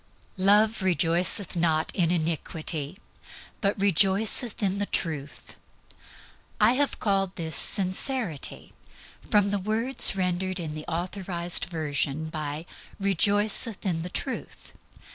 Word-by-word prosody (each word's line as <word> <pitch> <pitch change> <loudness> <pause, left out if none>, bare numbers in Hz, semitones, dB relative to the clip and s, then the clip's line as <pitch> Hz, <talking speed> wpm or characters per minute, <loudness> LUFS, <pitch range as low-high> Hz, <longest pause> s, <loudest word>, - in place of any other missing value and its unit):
"Love 210 +3 +4
rejoiceth 180 +1 +1
not 160 -2 0
in 175 -4 +1
unrighteousness, 160 -1 -2 0.6
but 200 0 0
rejoiceth 200 - +2
with 200 -1 -1
the 205 - -1
truth." 150 -4 -4 1.0
I 215 +2 +5
have 285 +2 0
called 195 -3 0
this 160 -3 -3
Sincerity 190 - +1 0.6
from 205 -1 +3
the 205 - 0
words 220 +5 +4
rendered 185 0 -2
in 160 -3 -5
the 155 0 -7
Authorized 175 0 -3
Version 155 -2 -2
by 155 0 -5 0.3
"rejoiceth 205 +3 +2
in 170 -4 -1
the 175 - -6
truth." 260 +7 -6
185 Hz, 110 wpm, -26 LUFS, 165-205 Hz, 1.0 s, I